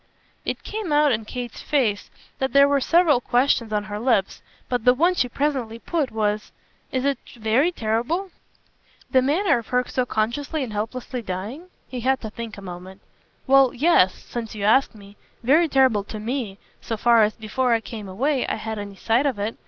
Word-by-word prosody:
It - - -3
came 420 -6 -4
out 295 -1 +4
in 220 -2 -1
Kate's 245 0 -6
face 235 -9 0 0.3
that 265 0 -1
there 280 0 +7
were 280 -1 +2
several 330 -4 +4
questions 245 -2 +1
on 210 -1 0
her 210 0 -6
lips, 225 -5 +1 0.3
but 245 -3 -1
the 250 +1 +5
one 345 +7 +3
she 250 -8 0
presently 260 -4 -2
put 295 +2 -2
was: 215 -1 -1 0.4
"Is 260 0 -1
it 280 -1 +1 0.2
very 235 +9 +2
terrible?" 275 - -1 0.8
"The 260 - +5
manner 300 +3 +2
of 230 - -11
her 250 0 +1
so 255 -1 -1
consciously 275 +8 -1
and 230 -4 -6
helplessly 240 +4 -4
dying?" 220 - -6 0.2
He 255 - -6
had 265 +2 +1
to 220 - -6
think 230 -1 -7
a 200 - -10
moment. 185 +1 -9 0.4
"Well, 270 -1 +5
yes 265 - +4
since 230 -2 -7
you 205 - -5
ask 225 +4 +3
me: 200 -1 -15 0.3
very 305 +8 +4
terrible 260 -8 +3
to 215 - -7
ME 225 -3 -3 0.2
so 225 - -4
far 235 +1 +5
as, 215 0 +2
before 240 +3 0
I - - +1
came 220 -3 -8
away, 265 +8 0
I - - -1
had 220 0 -5
any 200 -1 -7
sight 235 +8 +1
of 260 -6 -1
it. 210 +3 -3
240 Hz, 190 wpm, -23 LUFS, 215-275 Hz, 0.8 s, there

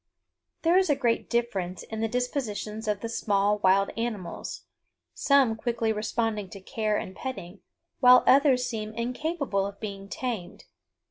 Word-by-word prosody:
There 340 +3 +5
is 375 -3 +1
a 290 - +4
great 240 -4 0
difference 195 -7 -1
in 220 - -6
the 225 - +1
dispositions 220 -3 -3
of 205 -1 0
the 230 - -3
small 205 -2 +1
wild 195 0 +3
animals, 220 -6 -4 0.5
some 275 -5 +3
quickly 225 -1 -1
responding 215 -1 -2
to 195 - -9
care 215 +2 -1
and 190 - -5
petting, 195 -8 -6 0.4
while 250 -1 +8
others 265 -2 +5
seem 215 -2 -4
incapable 250 - -1
of 200 0 -10
being 200 -2 -6
tamed. 215 -9 -5
220 Hz, 145 wpm, -27 LUFS, 200-250 Hz, 0.5 s, while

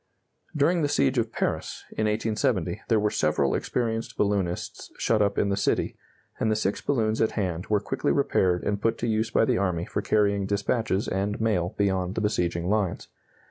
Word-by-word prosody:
During 165 +4 +3
the 145 - +2
siege 135 -3 +2
of 115 -1 -1
Paris, - - -2
in 110 - -1
1870, 105 -3 0
there 110 -2 +3
were 105 0 +1
several 70 -3 +1
experienced 115 -2 -2
balloonists 100 -4 -1
shut 110 -2 +2
up 100 -1 +1
in 100 - +2
the 100 - +1
city, 100 - 0 0.4
and 110 - +1
the 110 - +2
six 100 -2 -1
balloons 110 -5 0
at 110 - +2
hand 90 -4 -2
were 105 -1 +2
quickly 100 - -1
repaired 90 -2 +2
and 105 0 -1
put 115 +1 +1
to 120 - -2
use 110 0 0
by 115 - +3
the - - +1
army 90 -3 0
for - - -3
carrying 100 -2 +1
dispatches 105 0 0
and 100 +2 -1
mail 100 -6 0
beyond 95 -2 0
the - - -1
besieging 90 -5 0
lines. 100 -3 -1
105 Hz, 185 wpm, -26 LUFS, 95-110 Hz, 0.4 s, During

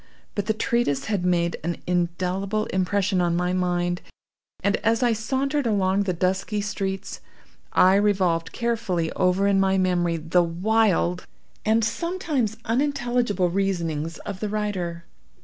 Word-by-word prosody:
But 205 -1 -3
the 220 - +2
treatise 230 - 0
had 205 -5 -1
made 170 -2 +1
an 170 +1 -2
indelible 180 +4 -1
impression 190 0 +1
on 170 -1 +1
my 180 +1 0
mind, 175 -1 0 0.6
and, 200 +1 +2
as 225 +2 +1
I 240 -1 +3
sauntered 265 +5 -1
along 195 -2 +2
the 185 - +1
dusky 190 +4 -1
streets, 195 -2 -3 0.5
I 185 +1 +5
revolved 185 -5 +1
carefully 215 -9 -1
over 185 +1 +2
in 200 -1 +3
my 195 0 +3
memory 175 -2 +1
the 165 +3 +2
wild 175 - +1 0.4
and 220 +1 +3
sometimes 300 - -1
unintelligible 240 -7 +1
reasonings 170 -5 -1
of 200 -2 -5
the 210 - -2
writer. 185 -5 -3
195 Hz, 135 wpm, -24 LUFS, 175-220 Hz, 0.6 s, I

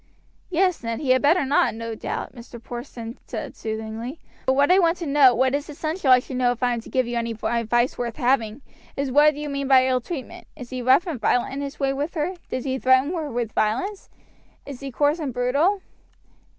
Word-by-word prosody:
"Yes, 365 0 +1
Ned, 230 0 -3
he 275 -4 0
had 255 - +4
better 300 +2 +3
not, 275 -4 +2
no 230 0 -5
doubt," 220 - -5
Mr. 235 -1 -11
Porson 240 0 -8
said - - -6
soothingly; 220 +5 -5 0.3
"but 260 - +4
what 285 +5 +4
I 375 - +6
want 340 -1 +3
to 340 - -5
know, 280 -4 +5
what 260 +2 +2
it 285 - +2
is 290 - -14
essential 310 +1 -2
I 255 - +9
should 250 +1 -5
know 250 -1 +3
if 245 0 -5
I 245 -1 +2
am 235 - -3
to - - -13
give 255 -1 +1
you 240 0 -3
any 230 -1 -3
advice 235 +2 +1
worth 240 -1 -3
having, 245 -2 0 0.3
is 275 -1 -1
what 295 +2 +5
you 295 +1 -5
mean 280 -1 -3
by 260 -1 +6
ill 255 -1 +1
treatment 275 0 -7
is 250 -1 -10
he 255 -1 -4
rough 260 +8 +4
and 310 -10 -5
violent 245 +4 +1
in 280 - -4
his 280 0 -6
way 270 -1 +1
with 290 +6 -3
her? 320 +4 -1 0.2
does 255 - -3
he 265 -1 -1
threaten 260 +5 +3
her 320 -4 -3
with 235 -3 -3
violence? 260 - -1 0.6
is 280 -3 -8
he 275 - -6
coarse 290 +6 +1
and 280 -6 -4
brutal?" 285 +11 +1
260 Hz, 230 wpm, -23 LUFS, 240-295 Hz, 0.6 s, I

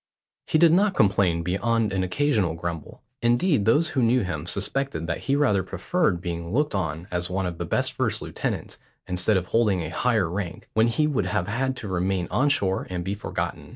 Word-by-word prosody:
He - - +2
did 165 0 +6
not 195 +1 +3
complain 95 -4 +2
beyond 105 +5 0
an 95 - 0
occasional 100 - +1
grumble; 85 -2 -6 0.2
indeed 120 - +2
those 150 +9 +3
who 130 - 0
knew 120 +1 +3
him 85 -3 -4
suspected 100 -2 -1
that 85 0 -2
he 140 - 0
rather 130 -10 +3
preferred 95 - -1
being 85 -2 -4
looked 145 +7 +1
on 80 -2 -3
as 90 0 -2
one 95 +1 -1
of 85 -2 -4
the - - -2
best - - 0
first - - 0
lieutenants - - -4 0.3
instead 90 +3 +1
of 90 - -1
holding 105 -3 +2
a 80 - -4
higher 110 -7 +1
rank, 90 -1 -5
when 110 +1 +4
he 135 +6 +1
would 135 -11 0
have 95 -1 -1
had 130 +5 -1
to 110 - -7
remain 95 -1 -1
on 145 +3 +2
shore 100 -10 0
and 90 -1 -3
be 95 +2 -2
forgotten. 105 - -4
100 Hz, 200 wpm, -25 LUFS, 90-125 Hz, 0.3 s, did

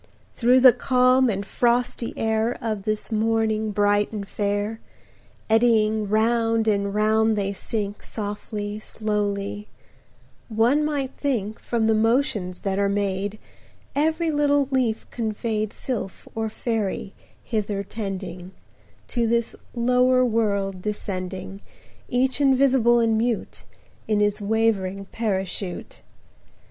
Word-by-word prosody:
Through 250 +2 +4
the 255 -2 +9
calm 255 +1 +3
and 200 -1 -2
frosty 240 +2 0
air 220 +2 0
Of 215 -3 -3
this 215 +1 -2
morning 220 0 +1
bright 205 0 +2
and 205 -2 -5
fair, 205 +2 -2 0.7
Eddying 220 -2 +3
round 225 +1 +2
and 200 -1 +1
round 215 +1 +2
they 200 -1 -1
sink 205 0 -4
Softly, 210 0 -5
slowly: 205 -1 -3 0.8
one 235 +7 +3
might 285 -3 -1
think, 220 -7 -2
10 - - -26
From 230 -2 0
the 220 - +4
motions 220 -5 +1
that 195 -1 -1
are 200 0 +2
made, 200 0 -1 0.6
Every 320 +3 +1
little 290 -2 +2
leaf 245 -5 0
conveyed 215 -2 -2
Sylph 235 -7 -5
or 220 0 -2
Faery 215 -3 -3 0.3
hither 205 -3 -2
tending,– 190 -3 -6 0.6
To 235 -1 0
this 235 0 0 0.2
lower 250 +1 +3
world 200 -5 0
descending, 190 -1 -5 0.5
Each 260 +3 +1
invisible 265 -3 +4
and 225 -1 +2
mute, 235 -1 -2 0.4
In 215 -1 +2
his 205 0 +1
wavering 200 -3 0
parachute. 195 -4 -3
220 Hz, 115 wpm, -24 LUFS, 205-235 Hz, 0.8 s, the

